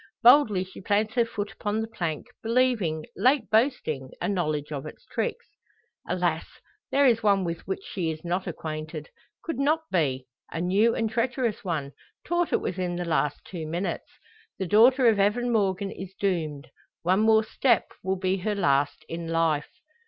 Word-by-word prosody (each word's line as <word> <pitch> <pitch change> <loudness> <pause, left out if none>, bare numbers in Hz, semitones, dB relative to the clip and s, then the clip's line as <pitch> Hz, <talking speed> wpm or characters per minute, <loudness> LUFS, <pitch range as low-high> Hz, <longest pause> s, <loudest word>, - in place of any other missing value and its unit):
Boldly 235 -7 +6
she 190 +1 -12
plants 210 +3 +1
her 240 -2 +3
foot 215 -2 -4
upon 215 -1 -2
the 225 - -2
plank, 165 -8 -3 0.2
believing, 225 -10 +1
late 255 +3 +2
boasting, 220 - +1
a - - -1
knowledge 155 -6 -1
of 140 -2 -4
its - - -12
tricks. - - -3 0.6
Alas! 175 -3 0 0.4
there 280 +1 +4
is 230 -3 +4
one 200 -3 +3
with 170 -1 -3
which 190 0 -3
she 175 -4 -3
is 155 +1 -6
not 180 +2 -1
acquainted 155 -2 -5 0.3
could 325 -4 -4
not 310 +3 +2
be 135 -7 0 0.3
a 165 - -4
new 200 +7 +3
and 225 -1 -1
treacherous 240 -1 -1
one, 155 -7 -2 0.3
taught 345 0 0
it - - +2
within 180 -1 -2
the 175 0 -3
last 150 -3 0
two 165 -4 -6
minutes. 175 +5 -3 0.5
The 190 - -2
daughter 240 +7 +5
of 220 -3 +4
Evan 240 +5 +2
Morgan 195 -3 +1
is 190 0 -8
doomed; 160 -7 -2 0.3
one 185 +3 +3
more 220 0 +5
step 235 +1 +2
will 190 +1 0
be 185 +1 0
her 205 +3 -2
last 145 -4 +1
in 165 0 -5
life! 165 -2 +1
190 Hz, 170 wpm, -26 LUFS, 165-225 Hz, 0.6 s, Boldly